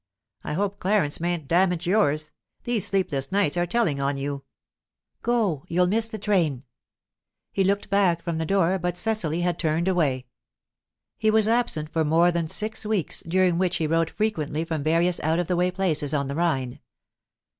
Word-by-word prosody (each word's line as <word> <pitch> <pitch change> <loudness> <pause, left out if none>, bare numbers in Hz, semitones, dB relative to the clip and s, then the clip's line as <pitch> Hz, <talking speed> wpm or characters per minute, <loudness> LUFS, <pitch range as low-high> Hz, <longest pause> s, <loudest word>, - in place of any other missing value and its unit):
"I - - -4
hope 200 +4 -2
Clarence 185 -6 +1
mayn't 170 -3 -2
damage 180 +1 +2
yours. 155 -6 +1 0.3
These 240 -5 -1
sleepless 175 -9 -1
nights 195 -6 +1
are 175 0 0
telling 170 -10 0
on 140 0 -1
you." 140 0 -4 0.8
"Go. 210 - 0
You'll 180 +2 +2
miss 225 +5 +1
the 220 - -6
train." 175 - 0 0.9
He 195 - +1
looked 200 +1 0
back 185 -4 +2
from 170 -2 -3
the 160 - -1
door, 190 0 +2
but 175 0 -2
Cecily 180 -7 -1
had 175 0 -1
turned 165 +2 0
away. 145 -9 +1 0.9
He 220 - +2
was 215 0 +4
absent 225 -10 +1
for 160 - +1
more 165 +3 +3
than 170 -2 -1
six 215 +7 0
weeks, 210 -7 -1
during 180 0 +2
which 180 -1 +1
he 160 - -1
wrote 165 +1 +1
frequently 160 -8 -2
from 160 -2 -3
various 170 +4 +1
out 160 +2 0
of 175 -1 -1
the 180 - 0
way 180 +1 +2
places 160 -6 -1
on 140 -1 -1
the 140 - -4
Rhine. 135 -7 -1
175 Hz, 175 wpm, -25 LUFS, 155-195 Hz, 0.9 s, was